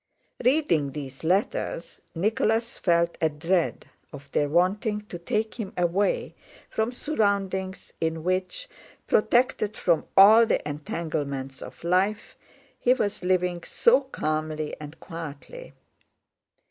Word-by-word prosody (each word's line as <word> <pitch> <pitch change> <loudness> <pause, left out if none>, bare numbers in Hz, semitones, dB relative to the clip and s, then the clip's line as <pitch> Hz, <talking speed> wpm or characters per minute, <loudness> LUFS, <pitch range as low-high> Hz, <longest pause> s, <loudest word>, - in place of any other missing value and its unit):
Reading 205 - +2
these 135 -2 -7
letters, 175 -1 -1
Nicholas 220 +5 0
felt 170 -1 +1
a 160 - +3
dread 165 +4 -1 0.3
of 140 -1 -12
their 145 - +1
wanting 200 +6 +1
to 175 - -6
take 220 +5 -2
him 200 -4 -4
away 180 +3 +1 0.4
from 220 +2 0
surroundings 200 -8 -1
in 160 -1 -1
which, 185 - -2 0.4
protected 220 -2 +2
from 170 -3 +1
all 220 +4 +9
the - - 0
entanglements 145 -3 -4
of - - -10
life, 190 +5 0 0.4
he 250 +1 +4
was 205 -6 -2
living 180 -1 +1
so 470 - +3
calmly 155 - -3
and 150 +1 -10
quietly. 165 - -8
180 Hz, 115 wpm, -26 LUFS, 155-215 Hz, 0.4 s, all